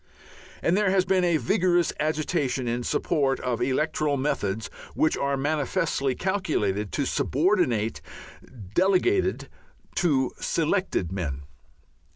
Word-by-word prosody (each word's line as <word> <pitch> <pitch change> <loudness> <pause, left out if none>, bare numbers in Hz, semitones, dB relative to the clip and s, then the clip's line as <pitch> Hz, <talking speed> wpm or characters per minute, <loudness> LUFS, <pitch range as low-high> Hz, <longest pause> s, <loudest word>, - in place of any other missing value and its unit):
And 170 - +3
there 205 -1 +2
has 190 -1 +2
been 190 -1 +2
a 170 -2 +3
vigorous 175 +6 +2
agitation 150 -4 -1
in 120 +1 -1
support 135 +2 0
of 125 -2 -2
electoral 145 +3 0
methods 110 -6 -1 0.3
which 155 - +2
are 140 0 -1
manifestly 145 -1 0
calculated 105 - -1
to 140 - 0
subordinate 135 - +1 0.7
"delegated" 195 - +2 0.5
to 135 -7 +2
"selected" 165 - 0
men. 75 -8 -4
150 Hz, 110 wpm, -26 LUFS, 125-175 Hz, 0.7 s, And